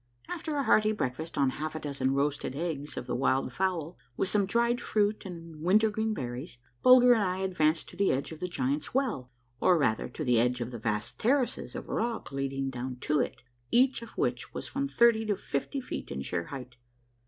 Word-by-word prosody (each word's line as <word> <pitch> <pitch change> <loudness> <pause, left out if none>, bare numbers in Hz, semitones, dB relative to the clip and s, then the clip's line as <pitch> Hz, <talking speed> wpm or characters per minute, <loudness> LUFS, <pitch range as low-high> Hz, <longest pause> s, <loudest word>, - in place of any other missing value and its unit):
After 325 -3 -4
a 280 - +1
hearty 215 -3 +4
breakfast 160 -3 -3
on 135 -2 +3
half 155 0 -3
a - - -2
dozen 135 -3 -1
roasted 140 -1 -1
eggs 150 -2 -3
of - - -4
the - - -3
wild 135 +1 +1
fowl, 180 -4 -1 0.2
with 190 - +1
some 205 -2 +2
dried 235 +3 +2
fruit 210 -1 0
and 165 -3 -9
wintergreen 215 +4 +2
berries, 125 +2 -5 0.2
Bulger 250 -1 +8
and 225 - +2
I 185 -2 0
advanced 175 -4 +1
to - - -13
the 200 +2 +2
edge 135 +4 -2
of 160 - -8
the 180 - -2
Giants' 145 - -2
Well, 230 - 0 0.3
or, 180 - +5
rather, 110 -8 +1
to 155 - -5
the 125 -4 +3
edge 125 +1 +2
of 120 0 -4
the 120 - -6
vast 105 0 -2
terraces 255 +2 +1
of - - -6
rock 230 -6 -2
leading 135 0 -2
down 125 0 -4
to 150 -1 +1
it, - - -2 0.3
each 255 0 +3
of 230 - -11
which - - -1
was - - -4
from 280 0 -2
thirty 235 -4 +4
to 205 - +2
fifty 165 - -3
feet 255 - -6
in 65 - -3
sheer 85 +3 -2
height. 125 -1 -8
165 Hz, 205 wpm, -29 LUFS, 135-215 Hz, 0.3 s, Bulger